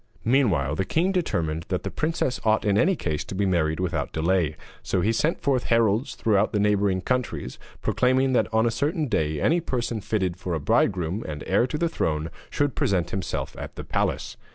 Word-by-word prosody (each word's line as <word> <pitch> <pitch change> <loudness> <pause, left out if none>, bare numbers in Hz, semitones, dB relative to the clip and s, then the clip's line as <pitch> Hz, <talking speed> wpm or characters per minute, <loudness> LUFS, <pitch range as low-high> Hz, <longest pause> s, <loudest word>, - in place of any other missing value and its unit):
Meanwhile 105 - +2
the 95 - +1
king 170 - +1
determined 85 - -1
that 90 - -1
the - - -3
princess 155 -5 -1
ought 110 -1 +2
in 100 -1 +3
any 185 - +3
case 75 - -2
to - - -7
be 100 +1 +1
married 80 -4 +1
without 90 -2 -1
delay, 80 -1 +1 0.3
so 95 - 0
he 110 +5 +2
sent 155 +8 +1
forth 135 -4 +1
heralds 115 +1 +2
throughout 105 -2 +2
the 105 - +1
neighbouring 100 -2 +2
countries, 125 - -2 0.2
proclaiming 130 +1 +2
that 120 - +2
on 110 +1 +3
a 115 - +2
certain 155 +6 0
day 80 - 0
any 170 - +3
person 120 -8 -2
fitted 95 -4 -1
for 90 -2 -3
a - - -1
bridegroom 90 +6 +1
and 75 -1 -5
heir 100 +6 +2
to 150 - -3
the 170 +2 +1
throne 80 - -2 0.2
should 145 -3 0
present 95 -5 0
himself 95 - -3
at - - -7
the - - -6
palace. - - -2
105 Hz, 200 wpm, -25 LUFS, 85-125 Hz, 0.3 s, in